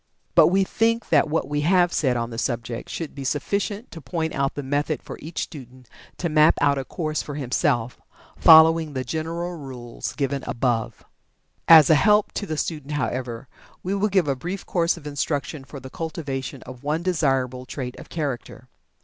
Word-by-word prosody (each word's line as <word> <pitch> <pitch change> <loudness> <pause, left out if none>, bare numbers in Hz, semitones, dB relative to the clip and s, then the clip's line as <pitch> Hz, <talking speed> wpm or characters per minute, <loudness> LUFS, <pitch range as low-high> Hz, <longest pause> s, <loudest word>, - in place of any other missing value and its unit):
But - - +7
we 195 +2 +3
think 230 +4 0
that 150 -2 +4
what 160 - 0
we 145 0 -1
have 175 +2 +3
said 130 -5 +1
on 115 0 -3
the 115 - -5
subject 120 -1 -3
should 165 -3 -5
be 140 - -7
sufficient 200 - -2
to 165 - -9
point 160 +1 -3
out 135 0 -1
the 145 - -4
method 145 +3 -1
for - - -7
each 160 +2 -4
student 130 -3 -11 0.3
to 175 - -1
map 155 0 +5
out 140 -1 +3
a - - -3
course 155 0 -3
for 145 - -7
himself, 125 -3 -1 0.3
following 160 -1 +7
the 130 -1 -2
general 165 +6 -3
rules 130 -6 -7
given 140 -2 -2
above. 120 -2 -1 0.6
As 160 -3 +9
a - - +8
help 210 +6 +4
to 205 - -4
the 155 -2 -3
student, 150 -2 -3
however, 130 -3 -3 0.4
we 185 - -2
will 200 +2 +1
give 190 -5 +2
a 140 - +1
brief 180 +8 -5
course 170 -1 +1
of 155 - -13
instruction 145 0 -3
for 140 +1 -10
the 130 0 -11
cultivation 140 -5 -5
of 125 0 -11
one 155 +4 -1
desirable 135 -7 0
trait 125 -2 -5
of - - -12
character. 135 -5 -5
145 Hz, 185 wpm, -24 LUFS, 130-165 Hz, 0.6 s, As